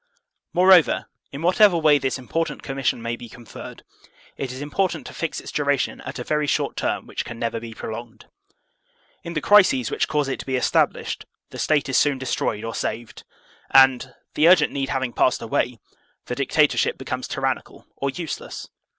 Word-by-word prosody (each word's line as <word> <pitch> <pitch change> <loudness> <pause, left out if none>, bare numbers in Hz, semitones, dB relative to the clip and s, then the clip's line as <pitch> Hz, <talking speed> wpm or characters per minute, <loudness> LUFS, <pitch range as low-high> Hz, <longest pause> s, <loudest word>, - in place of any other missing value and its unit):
Moreover, 180 -2 +5 0.3
in 140 +3 -7
whatever 185 +1 +5
way 155 -3 +4
this 135 -2 -1
important 165 +6 -3
commission 135 -4 -2
may 115 0 -2
be 120 0 -11
conferred, 120 -1 -11 0.5
it 135 -2 -4
is 130 - -7
important 170 +7 -1
to - - -9
fix 165 - -3
its - - -9
duration 145 -2 0
at - - -7
a 125 - -4
very 150 +2 0
short - - 0
term - - -2
which - - -4
can 120 - -8
never 115 0 -2
be 115 -1 -9
prolonged. 115 +1 -8 1.0
In 170 - -6
the 155 - 0
crises 185 - +4
which - - 0
cause 150 -2 0
it 135 - -3
to - - -7
be 130 - 0
established, 125 - 0 0.3
the - - -8
State 150 -3 +1
is 135 - +3
soon 145 -2 +2
destroyed 120 -4 -2
or 115 0 -4
saved; 115 +1 -5 0.4
and, 130 -1 +5 0.2
the 155 - +4
urgent 175 -5 +5
need 135 -1 -2
having 130 -3 -2
passed 130 - +2
away, 115 +1 -1 0.5
the - - -4
dictatorship - - +2
becomes - - -4
tyrannical - - -3
or 140 - -2
useless. 160 +3 -6
135 Hz, 175 wpm, -23 LUFS, 120-155 Hz, 1.0 s, Moreover